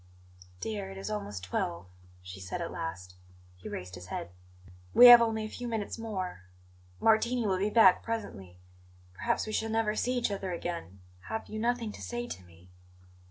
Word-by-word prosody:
"Dear, 105 -3 -3
it 95 - -9
is 95 +2 -5
almost 100 -2 -4
twelve," 90 -1 -2 0.4
she 90 +1 -9
said 90 -1 -5
at - - -4
last. 90 +2 -6 0.4
He 90 - -9
raised 90 0 -6
his 90 0 -9
head. 85 - -5 0.6
"We 245 - +10
have 240 -1 +12
only 220 -1 0
a - - -4
few 245 +3 -6
minutes 225 -1 -3
more; 190 - -4 0.6
Martini 230 +2 +3
will 190 -2 +1
be 200 +2 +1
back 210 -5 +6
presently. 100 - -5 0.6
Perhaps - - -1
we 215 - -5
shall 225 +1 0
never 220 -1 +1
see 250 +3 0
each 235 -3 0
other 195 -2 -3
again. 170 - -5 0.3
Have 220 0 -4
you 215 - -5
nothing 235 -1 0
to - - -11
say 240 0 -4
to 95 - -7
me?" 90 +1 -19
190 Hz, 180 wpm, -30 LUFS, -, 0.6 s, have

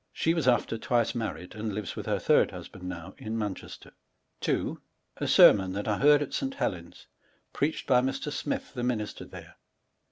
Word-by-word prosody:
She 165 - +1
was 165 -6 -1
after 120 -2 +2
^^ni - - -16
twice 120 -3 +1
married, 110 -6 -4
and 110 -1 -4
lives 105 -3 -4
with - - -6
hor - - +1
third - - +3
husband 90 -1 -9
now, 90 +1 -7
in 110 +1 -4
Mancheaterj 105 -4 -6 0.5
2. - - -1 0.4
A - - -2
Sermon 95 -2 +6
that 100 +2 -4
I 105 -1 0
heard 145 +1 +6
at 145 - -8
St. 270 0 -2
Helen's, 85 - -4 0.5
preached 150 +3 -1
by 125 -2 +4
Mr. 135 +3 -2
Smil 145 - -3
the 125 - -4
minister 115 -4 -2
there. - - -12
115 Hz, 185 wpm, -28 LUFS, 100-135 Hz, 0.5 s, Sermon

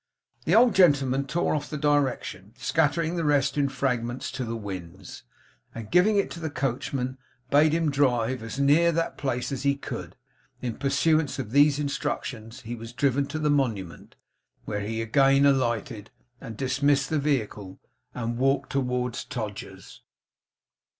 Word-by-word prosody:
The - - +3
old 235 -1 +6
gentleman 140 -6 +3
tore 170 +5 0
off 150 -1 -3
the 150 - -4
direction 145 -3 -1
scattering 170 +1 0
the 165 - -1
rest 140 -2 +2
in 140 -2 +1
fragments 125 -2 -2
to 130 -1 -4
the 115 -1 -4
winds 95 -3 -8 0.5
and 110 -2 -8
giving 195 +4 +4
it 200 - +1
to 170 - -7
the 160 -1 -3
coachman, 130 -1 -3 0.3
bade 150 +2 +5
him 160 -1 +1
drive 130 -3 +1
as 115 +4 -6
near 150 +5 +4
that 165 +1 -1
place 125 -1 -2
as 135 - -3
he 140 0 +2
could. 140 - -7 0.4
In 120 -3 -4
pursuance 140 +3 +1
of 125 -6 -5
these 145 +1 +5
instructions 140 -5 -4
he 120 0 -6
was 115 0 -8
driven 140 +2 +1
to 155 - -4
the 150 -1 +1
Monument; 110 - -2 0.5
where 105 -1 -3
he 110 +2 -3
again 135 +4 +4
alighted, 120 -6 0 0.3
and 110 -2 -8
dismissed 140 +2 +1
the 155 - +2
vehicle, 110 -9 -2 0.4
and 120 0 -3
walked 135 +2 +1
towards 125 -2 -1
Todgers's. 110 -5 -7
135 Hz, 155 wpm, -26 LUFS, 120-145 Hz, 0.5 s, old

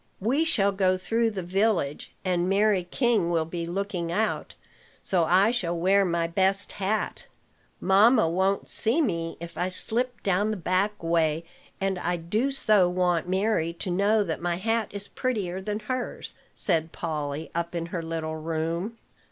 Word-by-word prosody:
"We 265 +11 +1
shall 200 -11 +2
go 190 -1 +2
through 225 +5 +1
the 195 -4 -5
village, 185 -5 0
and 180 -1 +1
Mary 200 -2 +3
King 230 -8 +2
will 165 -2 +1
be 170 +1 -5
looking 180 -2 -3
out; 215 +4 -1 0.5
so 175 -3 +2
I 190 +6 +4
shall 175 -8 -1
wear 195 +4 +4
my 170 -1 0
best 190 +4 +2
hat. 205 +2 -2 0.5
Mamma 205 +2 +5
won't 190 +4 0
see 235 +7 +2
me, 170 - -1
if 170 0 -8
I 180 - 0
slip 240 +6 -2
down 200 +2 +1
the 215 - -2
back 185 +3 0
way; 165 -1 +1 0.3
and 195 -1 -1
I 175 0 -1
do 210 +10 -1
so 215 -9 +3
want 180 -1 0
Mary 190 -3 +1
to 175 +2 -5
know 205 +4 +3
that 165 -4 -4
my 175 0 0
hat 225 +4 0
is 200 0 -6
prettier 195 -8 -2
than 210 +2 -3
hers," 255 +3 -4 0.2
said 165 -4 0
Polly, 155 -2 -4
up 170 +1 -3
in 165 -1 -2
her 170 - -1
little 160 -1 -4
room. 165 +7 -3
185 Hz, 165 wpm, -26 LUFS, 170-210 Hz, 0.5 s, Mamma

